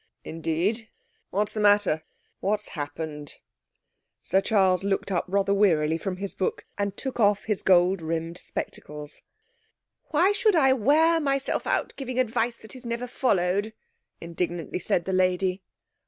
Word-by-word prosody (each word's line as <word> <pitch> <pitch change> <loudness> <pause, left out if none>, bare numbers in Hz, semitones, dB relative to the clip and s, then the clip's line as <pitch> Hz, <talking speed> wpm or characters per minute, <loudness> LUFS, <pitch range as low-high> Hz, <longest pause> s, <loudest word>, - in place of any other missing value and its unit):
'Indeed! 170 +8 -2 0.4
What's 205 +2 -1
the 215 - -3
matter? 205 -6 +4 0.4
What 205 +2 0
has - - -7
happened?' 150 0 -6 0.8
Sir 190 +2 +1
Charles 195 -3 +2
looked 200 0 -1
up 175 - 0
rather 200 +1 +1
wearily 165 -6 +3
from 185 0 -3
his 195 0 -5
book 185 - -2
and 200 -1 -2
took 265 -2 -5
off 205 -2 +3
his 210 -3 -1
gold 180 0 +4
rimmed 165 +1 -3
spectacles. 150 0 -7 0.8
'Why 340 +6 +3
should 420 -1 +2
I 265 -5 +5
wear 310 +7 +4
myself 275 -3 -1
out - - 0
giving 255 -2 -3
advice 235 -1 0
that 220 - -13
is 255 - -9
never 235 +1 -3
followed?' 205 -4 0 0.5
indignantly 170 0 -3
said 175 -1 0
the 190 - -2
lady. 185 0 +1
195 Hz, 145 wpm, -26 LUFS, 175-230 Hz, 0.8 s, I